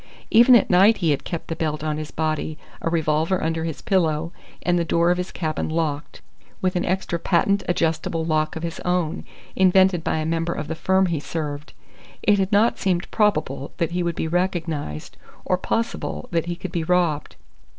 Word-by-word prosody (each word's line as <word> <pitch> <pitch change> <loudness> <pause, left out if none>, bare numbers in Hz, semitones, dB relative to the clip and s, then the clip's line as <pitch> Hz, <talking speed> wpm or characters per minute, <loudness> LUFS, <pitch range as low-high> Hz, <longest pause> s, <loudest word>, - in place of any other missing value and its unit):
Even 240 +3 +7
at 235 - +5
night 195 +5 +6
he 165 -5 +1
had 140 - -1
kept 170 - -5
the 165 - -3
belt 155 -2 -2
on 155 -1 -1
his 155 -1 -5
body, 155 -1 -2 0.2
a - - -1
revolver 160 +2 +1
under 160 0 -1
his 160 -3 -5
pillow, 165 -4 +1 0.3
and 175 -1 +2
the - - +1
door 170 +1 +2
of 180 - 0
his 180 - -4
cabin 155 -2 -2
locked, 155 -2 -3 0.4
with 185 -1 0
an 175 - +1
extra 185 -2 -1
patent 200 +3 +2
adjustable 165 -1 0
lock 155 -1 0
of 160 - -5
his 165 -1 -4
own, 180 -3 -1 0.3
invented 185 -2 +4
by - - 0
a 155 - -2
member 165 +1 -1
of 150 - -5
the 160 - -3
firm 190 +4 +2
he 170 -4 -1
served. 150 -1 -5 0.5
It 205 -1 +4
had 190 +1 0
not 210 +3 +3
seemed 180 -2 -1
probable 155 -10 0
that 165 -1 -1
he 180 +1 -1
would 170 -1 -1
be - - -2
recognized, 165 - -2 0.3
or 185 - +2
possible 230 +5 -3
that 170 -1 0
he 175 - -2
could 180 0 -7
be 170 -2 -1
robbed. 170 -3 0
170 Hz, 195 wpm, -23 LUFS, 155-180 Hz, 0.5 s, Even